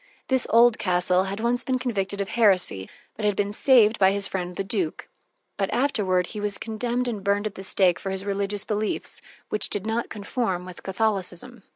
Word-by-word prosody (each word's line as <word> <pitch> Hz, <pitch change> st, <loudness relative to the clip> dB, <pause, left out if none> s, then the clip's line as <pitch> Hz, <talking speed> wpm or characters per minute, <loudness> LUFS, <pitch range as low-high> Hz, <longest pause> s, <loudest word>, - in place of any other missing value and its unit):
This 260 Hz, -1 st, +2 dB
Oldcastle 185 Hz, -6 st, +3 dB
had 195 Hz, +2 st, -4 dB
once 240 Hz, +2 st, 0 dB
been 260 Hz, -1 st, 0 dB
convicted 200 Hz, -5 st, -2 dB
of 195 Hz, -, -3 dB
heresy, 185 Hz, -, +2 dB, 0.3 s
but 215 Hz, -, -7 dB
had 205 Hz, -1 st, +2 dB
been 205 Hz, +1 st, -1 dB
saved 225 Hz, -3 st, +4 dB
by 190 Hz, -1 st, +6 dB
his 200 Hz, 0 st, -1 dB
friend 180 Hz, -2 st, -4 dB
the 195 Hz, -, -2 dB
duke. 190 Hz, -5 st, -2 dB, 0.5 s
But -, -, -1 dB
afterward 205 Hz, -10 st, +1 dB
he 210 Hz, -, -5 dB
was 205 Hz, -1 st, -2 dB
condemned 240 Hz, +3 st, -2 dB
and 215 Hz, -5 st, -4 dB
burned 200 Hz, +1 st, +1 dB
at 215 Hz, -, -3 dB
the 190 Hz, -, -8 dB
stake 185 Hz, -2 st, +3 dB
for 195 Hz, -, -5 dB
his 190 Hz, 0 st, -4 dB
religious 200 Hz, 0 st, -2 dB
beliefs, 210 Hz, 0 st, -1 dB, 0.3 s
which 210 Hz, -, +1 dB
did 205 Hz, -1 st, -2 dB
not 225 Hz, +2 st, -2 dB
conform 200 Hz, -3 st, -3 dB
with 185 Hz, -1 st, -10 dB
Catholicism. 205 Hz, +2 st, -1 dB
205 Hz, 190 wpm, -25 LUFS, 190-225 Hz, 0.5 s, by